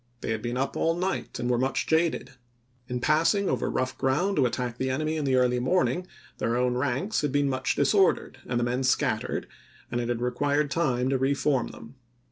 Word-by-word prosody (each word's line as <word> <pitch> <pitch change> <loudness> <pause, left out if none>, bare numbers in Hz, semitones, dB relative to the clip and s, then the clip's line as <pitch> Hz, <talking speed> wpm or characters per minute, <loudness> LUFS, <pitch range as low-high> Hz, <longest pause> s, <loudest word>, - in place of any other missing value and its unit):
They - - -3
had 110 -1 -2
been 120 +2 -3
up 135 +1 -1
all 165 0 +1
night 185 +2 -2
and 120 - -2
were 125 -1 +2
much 130 +1 0
jaded. 160 +1 +1 0.6
In 125 -1 -3
passing 165 - +3
over - - 0
rough 130 0 -1
ground 175 +10 +1
to 135 -3 +4
attack 120 -1 -4
the 130 - 0
enemy 155 +4 -1
in 155 -2 -2
the 130 -1 +2
early 125 -1 +3
morning, 180 +5 +1 0.3
their 115 +1 0
own 125 0 +1
ranks 140 - -1
had 150 -2 -1
been 145 +1 +2
much 130 -1 0
disordered, 180 -2 +2
and 120 -1 0
the - - +1
men 125 +2 0
scat 130 - +2
tered, - - -4 0.5
and 120 0 0
it 120 - -3
had 120 -1 -1
required 145 +4 0
time 130 -6 +1
to 135 - +1
re 135 +2 +2
form 135 -4 +1
them. 120 +4 -12
130 Hz, 215 wpm, -27 LUFS, 125-155 Hz, 0.6 s, to